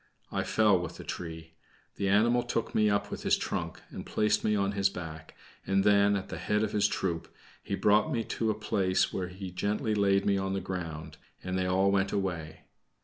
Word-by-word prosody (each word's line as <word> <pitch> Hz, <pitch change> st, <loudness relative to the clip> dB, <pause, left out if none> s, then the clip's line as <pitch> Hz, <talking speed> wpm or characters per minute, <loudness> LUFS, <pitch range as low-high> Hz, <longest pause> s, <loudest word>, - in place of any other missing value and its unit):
I -, -, 0 dB
fell 105 Hz, -4 st, +3 dB
with 85 Hz, -1 st, -6 dB
the -, -, -8 dB
tree; 80 Hz, -1 st, -7 dB, 0.4 s
the 100 Hz, -, 0 dB
animal 115 Hz, +5 st, +4 dB
took 120 Hz, -2 st, -2 dB
me 105 Hz, -1 st, +3 dB
up 100 Hz, 0 st, 0 dB
with -, -, -5 dB
his -, -, +3 dB
trunk, -, -, -4 dB
and -, -, -6 dB
placed 105 Hz, 0 st, +1 dB
me 105 Hz, -, +2 dB
on 100 Hz, -1 st, +1 dB
his 100 Hz, -1 st, +2 dB
back, 80 Hz, -4 st, -8 dB, 0.3 s
and 95 Hz, 0 st, +2 dB
then, 100 Hz, 0 st, +4 dB
at 100 Hz, -, -4 dB
the -, -, -5 dB
head 105 Hz, +1 st, 0 dB
of 105 Hz, -, -1 dB
his 105 Hz, -1 st, +3 dB
troop, 85 Hz, -3 st, -2 dB, 0.3 s
he -, -, -3 dB
brought 105 Hz, +9 st, +3 dB
me 115 Hz, -4 st, 0 dB
to 110 Hz, 0 st, -2 dB
a 110 Hz, -, +1 dB
place 100 Hz, -3 st, +1 dB
where 90 Hz, -1 st, -2 dB
he 95 Hz, +1 st, -7 dB
gently 105 Hz, +4 st, -1 dB
laid 100 Hz, -1 st, +2 dB
me 100 Hz, -1 st, +2 dB
on 95 Hz, 0 st, -2 dB
the 95 Hz, -, 0 dB
ground, 80 Hz, -5 st, -6 dB, 0.3 s
and 90 Hz, 0 st, -3 dB
they 95 Hz, 0 st, 0 dB
all 95 Hz, +2 st, +3 dB
went 95 Hz, 0 st, +1 dB
away. 85 Hz, -6 st, -3 dB
100 Hz, 210 wpm, -29 LUFS, 90-105 Hz, 0.4 s, animal